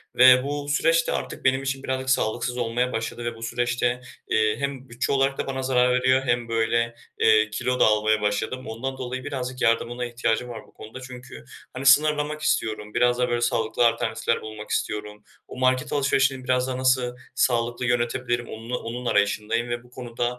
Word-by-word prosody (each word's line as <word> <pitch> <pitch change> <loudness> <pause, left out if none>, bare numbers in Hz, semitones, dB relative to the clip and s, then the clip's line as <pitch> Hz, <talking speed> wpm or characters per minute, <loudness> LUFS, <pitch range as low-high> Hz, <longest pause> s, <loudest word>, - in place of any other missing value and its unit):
ve 130 0 +7
bu 145 0 -4
süreç 165 +3 +2
de - - 0
artık - - -4
benim 130 +1 +3
için 135 0 -3
birazcık 130 0 -2
sağlıksız 120 0 0
olmaya 120 +1 0
başladı 115 +1 -4
ve 120 -1 -3
bu 115 - -10
süreçte, 120 +1 -1 0.3
eee, 110 -1 +2
hem 135 -2 -4
bütçe 120 +2 -2
olarak 135 0 +1
da - - -3
bana 130 -1 -3
zarar 125 -1 +3
veriyor 130 +1 +3
hem, 120 -1 0
böyle, 115 +1 0 0.2
eee, 110 -1 +4
kilo 120 +4 -2
da - - +6
almaya 110 0 +2
başladım. 110 +5 -2
Ondan 130 +4 -4
dolayı 130 0 -5
birazcık 130 -3 -5
yardımına 120 +2 +1
ihtiyacım 120 0 -1
var 115 -2 -7
bu - - -23
konuda 110 +4 -10
çünkü, 125 - -10 0.3
hani, 135 - -6
sınırlamak 150 +1 +4
istiyorum, 105 -7 -1
biraz 120 0 +3
daha 125 - +1
böyle, 120 0 0
sağlıklı 120 0 +2
alternatifler 115 0 -1
bulmak 110 -1 -9
istiyorum. 105 0 -3 0.2
O - - -10
market 130 +1 +1
alışverişini 135 -2 +1
biraz 125 0 +1
daha 130 -1 -3
nasıl 130 -1 +1 0.2
sağlıklı 120 0 +1
yönetebilirim, 120 0 0
onnu 115 +3 -5
onun 120 +2 -6
arayışındayım 110 +2 0
ve 120 0 -3
bu 125 - -20
konuda, 120 -1 -4
125 Hz, 180 wpm, -24 LUFS, 115-130 Hz, 0.3 s, ve